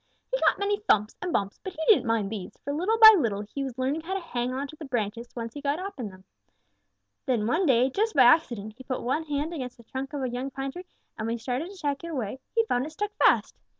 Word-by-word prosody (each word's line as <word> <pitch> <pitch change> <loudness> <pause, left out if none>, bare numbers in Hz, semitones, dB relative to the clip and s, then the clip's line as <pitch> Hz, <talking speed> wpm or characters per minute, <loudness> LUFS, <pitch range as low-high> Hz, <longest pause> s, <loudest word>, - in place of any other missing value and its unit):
He - - +2
got - - +3
many 405 +1 0
thumps 215 - +2
and 360 - -2
bumps, 200 -8 -1
but 380 - -5
he 325 - -13
didn't 275 - +5
mind 220 -3 0
these, 200 -5 -6
for 285 - -3
little 370 +9 +1
by 440 -1 +11
little 220 - 0
he 215 +7 -5
was 260 -2 -5
learning 270 +5 -1
how 370 +4 -4
to - - 0
hang 250 -8 -3
on 270 +2 -3
to 310 - -10
the 310 - -10
branches 235 -2 -3
once 230 -1 -5
he 290 - -7
got 285 +1 0
up 380 -4 -6
in 225 -4 -3
them. 185 -1 -15 1.0
Then 235 -5 +1
one 325 - +1
day, 255 -1 +4
just 435 - 0
by 265 - +7
accident, 240 -6 +3
he 260 - -12
put 255 -1 -4
one 295 +6 -1
hand 295 +2 -2
against 255 -5 -5
the 235 - -16
trunk 265 +5 -6
of 285 -2 -3
a 255 - -1
young 250 +3 -3
pine 270 0 -4
tree, 360 +5 -9 0.3
and 220 - -2
when 230 - -1
he - - -7
started 255 +8 -3
to 395 - -12
take 290 -2 -2
it - - -5
away, 260 -6 -4 0.2
he 455 -1 +3
found 250 - 0
it 310 - -10
stuck 415 +5 -3
fast. - - +3
270 Hz, 270 wpm, -27 LUFS, 235-330 Hz, 1.0 s, by